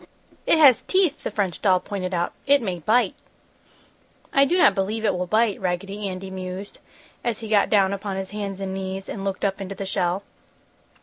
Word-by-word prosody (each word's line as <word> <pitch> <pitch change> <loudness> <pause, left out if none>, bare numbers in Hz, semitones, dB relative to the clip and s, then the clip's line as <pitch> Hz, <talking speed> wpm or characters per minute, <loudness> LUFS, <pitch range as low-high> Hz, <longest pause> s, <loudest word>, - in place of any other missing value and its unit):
"It - - +5
has 280 -6 +7
teeth!" 370 -6 +1
the - - -3
French 200 -5 -2
doll 185 -3 +4
pointed 185 -1 -4
out. 175 -1 -1
"It 285 0 +6
may 185 -4 -3
bite!" 225 +9 +2 1.2
"I 275 0 +5
do 345 +6 +1
not 335 - +6
believe 210 +4 -2
it - - +3
will 180 0 -2
bite," 215 0 +2
Raggedy 195 +3 -2
Andy 190 +1 -6
mused, 185 +1 -7 0.4
as 235 -1 -2
he 225 - -6
got 210 -2 +3
down 200 -2 +3
upon 200 0 -4
his 190 0 -5
hands 200 -2 -4
and 190 -1 -3
knees 190 0 -5
and 195 - -5
looked 195 0 -2
up 195 0 -1
into 195 0 -5
the 195 - -5
shell. 185 0 -1
195 Hz, 195 wpm, -24 LUFS, 190-215 Hz, 1.2 s, has